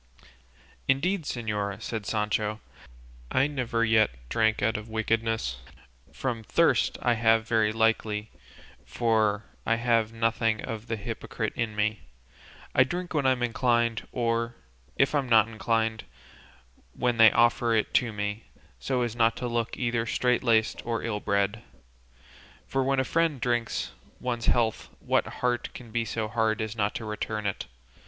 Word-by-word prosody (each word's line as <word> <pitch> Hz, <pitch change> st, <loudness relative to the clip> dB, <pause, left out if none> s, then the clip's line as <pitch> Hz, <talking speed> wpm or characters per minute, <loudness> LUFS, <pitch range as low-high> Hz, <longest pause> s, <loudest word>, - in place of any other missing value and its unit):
'" 65 Hz, -, -29 dB
"Indeed, 160 Hz, +6 st, +1 dB
señora," 105 Hz, -5 st, -3 dB
said 110 Hz, -2 st, -5 dB
Sancho, 105 Hz, 0 st, -1 dB, 0.7 s
"I 130 Hz, -, +3 dB
never 125 Hz, -5 st, 0 dB
yet 110 Hz, -1 st, +4 dB, 0.2 s
drank 110 Hz, -1 st, +1 dB
out 110 Hz, +2 st, +2 dB
of 105 Hz, +1 st, -5 dB
wickedness; 110 Hz, -, -1 dB, 0.5 s
from 120 Hz, -4 st, -3 dB
thirst 165 Hz, +9 st, +2 dB
I 120 Hz, -, +4 dB
have 115 Hz, 0 st, +3 dB
very 110 Hz, -2 st, +2 dB
likely, 110 Hz, -1 st, 0 dB, 0.5 s
for 110 Hz, -3 st, +1 dB, 0.2 s
I 115 Hz, -, +2 dB
have 115 Hz, -2 st, +1 dB
nothing 115 Hz, -1 st, +1 dB
of 115 Hz, +1 st, -6 dB
the 115 Hz, -, -1 dB
hypocrite 100 Hz, -, -4 dB
in 110 Hz, -2 st, -2 dB
me; 105 Hz, 0 st, 0 dB, 0.7 s
I 130 Hz, -, +6 dB
drink 175 Hz, +7 st, -4 dB
when 145 Hz, -4 st, +2 dB
I'm 130 Hz, -2 st, +2 dB
inclined, 120 Hz, -1 st, +1 dB
or, 115 Hz, -1 st, -1 dB, 0.4 s
if 135 Hz, -, +2 dB
I'm 140 Hz, -4 st, 0 dB
not 110 Hz, -2 st, +6 dB
inclined, 110 Hz, 0 st, -1 dB, 0.9 s
when 120 Hz, -2 st, 0 dB
they 115 Hz, -1 st, +8 dB
offer 120 Hz, 0 st, +3 dB
it 110 Hz, -, 0 dB
to 120 Hz, -3 st, +2 dB
me, 105 Hz, +1 st, -4 dB, 0.3 s
so 125 Hz, -, 0 dB
as 120 Hz, -1 st, -3 dB
not 115 Hz, -1 st, +3 dB
to 125 Hz, -, -3 dB
look 115 Hz, -1 st, -2 dB
either 115 Hz, -2 st, -1 dB
strait 125 Hz, +3 st, +1 dB
laced 115 Hz, -2 st, +2 dB
or 115 Hz, -1 st, -2 dB
ill 105 Hz, -3 st, -2 dB
bred; 100 Hz, +1 st, 0 dB, 1.0 s
for 135 Hz, 0 st, 0 dB
when 135 Hz, 0 st, +1 dB
a -, -, +3 dB
friend 165 Hz, -1 st, +1 dB
drinks 120 Hz, -2 st, -1 dB, 0.3 s
one's 120 Hz, -2 st, -3 dB
health 115 Hz, -2 st, +1 dB
what -, -, +1 dB
heart 125 Hz, -1 st, -2 dB
can 120 Hz, -3 st, -10 dB
be 115 Hz, +1 st, 0 dB
so 110 Hz, -1 st, -2 dB
hard 110 Hz, -1 st, 0 dB
as 110 Hz, -1 st, -3 dB
not 105 Hz, -2 st, 0 dB
to 110 Hz, -, -4 dB
return 105 Hz, 0 st, -3 dB
it? 100 Hz, -, -3 dB
115 Hz, 155 wpm, -27 LUFS, 110-120 Hz, 1.0 s, they